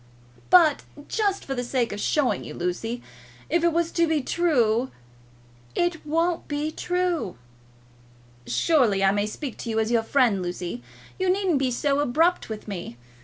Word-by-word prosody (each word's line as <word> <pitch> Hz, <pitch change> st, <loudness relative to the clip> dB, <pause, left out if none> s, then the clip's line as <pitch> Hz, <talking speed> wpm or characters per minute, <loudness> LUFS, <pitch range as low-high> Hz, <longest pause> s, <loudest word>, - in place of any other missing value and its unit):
"But 325 Hz, -5 st, +6 dB, 0.3 s
just 405 Hz, -3 st, 0 dB
for 270 Hz, -, -3 dB
the 245 Hz, -2 st, -2 dB
sake 245 Hz, -1 st, -1 dB
of 205 Hz, -, -5 dB
showing 290 Hz, +4 st, +1 dB
you, -, -, -8 dB
Lucy; 225 Hz, +7 st, -3 dB, 0.5 s
if 340 Hz, +1 st, +2 dB
it 340 Hz, -, +4 dB
was 335 Hz, 0 st, 0 dB
to 335 Hz, -1 st, +2 dB
be 310 Hz, -3 st, +1 dB
true." 255 Hz, -8 st, +2 dB, 0.9 s
"It 345 Hz, -2 st, 0 dB
won't 330 Hz, +2 st, 0 dB
be 295 Hz, +1 st, -2 dB
true." 355 Hz, -, -1 dB, 1.1 s
"Surely 240 Hz, -12 st, +2 dB
I 195 Hz, -, +5 dB
may 205 Hz, +1 st, 0 dB
speak 260 Hz, +4 st, -6 dB
to 235 Hz, -, -5 dB
you 220 Hz, -, -1 dB
as 220 Hz, +1 st, 0 dB
your 235 Hz, -1 st, +3 dB
friend, 225 Hz, -4 st, +2 dB
Lucy. 175 Hz, -6 st, -4 dB, 0.4 s
You 375 Hz, 0 st, +1 dB
needn't 370 Hz, -5 st, +2 dB
be 265 Hz, -1 st, +1 dB
so 275 Hz, +3 st, 0 dB
abrupt 315 Hz, +5 st, +2 dB
with 220 Hz, 0 st, -7 dB
me. 175 Hz, -, -6 dB
275 Hz, 165 wpm, -25 LUFS, 220-335 Hz, 1.1 s, But